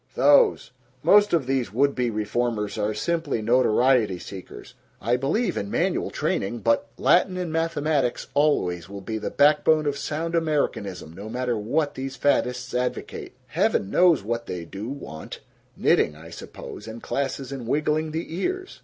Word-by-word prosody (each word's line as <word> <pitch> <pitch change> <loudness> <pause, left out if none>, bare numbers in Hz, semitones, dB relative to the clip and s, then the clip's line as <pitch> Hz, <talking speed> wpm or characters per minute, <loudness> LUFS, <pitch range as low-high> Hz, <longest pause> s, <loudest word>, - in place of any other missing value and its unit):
Those. 485 -4 +4 0.3
Most 205 0 +6
of 165 -6 +2
these 130 -6 -1
would 140 +5 +2
be 125 -1 0
reformers 110 0 -1
are 105 0 0
simply 165 -7 -1
notoriety 120 -2 +3
seekers. 95 +1 -10 0.3
I 120 +4 +1
believe 145 - 0
in 100 - -3
manual - - 0
training, 115 +4 -2
but 115 0 +1
Latin 185 +1 +3
and 175 -3 -3
mathematics 155 -5 0
always 90 - +1
will 100 0 -7
be 110 +3 -4
the - - -3
backbone 150 +1 +4
of 145 -1 -1
sound 165 +2 -3
Americanism, 145 - -1
no 100 +5 -8
matter 125 +1 -1
what 140 +8 0
these 135 0 -5
faddists 125 -2 0
advocate 125 0 -3
heaven 95 - 0
knows 175 - +4
what 115 +2 -3
they 90 -2 -5
do 100 +7 -7
want 130 - -8 0.4
knitting, 75 - +3
I 80 +2 -12
suppose, 105 - -9
and 110 +1 -8
classes 135 -1 -3
in 130 -4 -6
wiggling 150 +3 0
the 160 +1 -4
ears!" 375 - -3
125 Hz, 155 wpm, -25 LUFS, 110-155 Hz, 0.4 s, Most